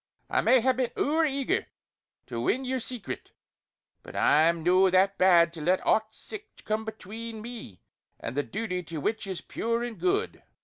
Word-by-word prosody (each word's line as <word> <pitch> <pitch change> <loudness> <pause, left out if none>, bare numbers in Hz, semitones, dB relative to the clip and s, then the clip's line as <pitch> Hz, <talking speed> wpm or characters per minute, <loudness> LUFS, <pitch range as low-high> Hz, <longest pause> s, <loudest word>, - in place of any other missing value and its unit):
I - - +3
may 260 -1 +5
hae 260 +3 +4
been 255 -1 -1
ower 315 +3 +2
eager 275 -2 0 0.6
to 115 -2 -4
win 260 - 0
yer 260 0 -1
secret; 245 -1 -6 0.7
but - - -12
I'm 160 +2 +4
no 185 +2 +5
that 190 +2 +3
bad 170 -2 +5
to 165 - -8
let 180 +4 +1
aught 220 0 +2
sic 425 0 -10
come 215 +1 -1
between 220 +1 -7
me 220 - -9 0.4
and 115 - -5
the 145 - +2
duty 180 +1 -3
to 165 -2 -6
what 220 +7 -2
is 190 -2 -4
pure 230 +1 -2
and 240 -2 -5
good!" 390 +4 0
220 Hz, 175 wpm, -28 LUFS, 180-245 Hz, 0.7 s, may